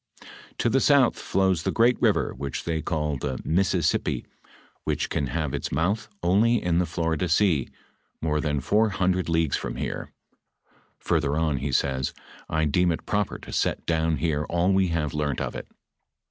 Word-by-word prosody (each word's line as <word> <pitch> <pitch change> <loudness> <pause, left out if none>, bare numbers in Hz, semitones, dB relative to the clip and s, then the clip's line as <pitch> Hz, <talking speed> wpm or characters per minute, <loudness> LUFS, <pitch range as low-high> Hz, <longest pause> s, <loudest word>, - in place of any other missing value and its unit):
"To - - +1
the 125 +3 +3
south 140 -4 +4
flows 95 -3 +1
the - - -1
great 120 +2 +4
river, - - +2
which 70 0 -5
they 80 -1 -2
call 75 -3 -1
the 65 0 -3
Missisipi, 90 -1 +1 0.6
which - - -2
can 70 - 0
have 75 +1 -2
its 70 - -3
mouth 90 +10 0
only 105 +7 +4
in 85 -2 +1
the 90 - +1
Florida 80 +1 -1
sea, 85 -4 +3 0.5
more 75 -1 0
than 75 -2 -1
four 105 - +2
hundred 95 -2 0
leagues 80 -3 +1
from - - -5
here."f - - -4 0.9
Further 75 -3 0
on 80 -3 +1
he 70 +2 -3
says, 65 0 0 0.2
" - - -19
I 80 0 +1
deem 90 +4 +2
it 80 - -4
proper 105 -1 -1
to - - -10
set - - 0
down 80 -1 +1
here 75 0 0
all 85 +3 +1
we 95 -1 +3
have 85 -3 -1
learnt 75 -3 -1
of - - -3
it. - - -6
80 Hz, 175 wpm, -25 LUFS, 75-95 Hz, 0.9 s, south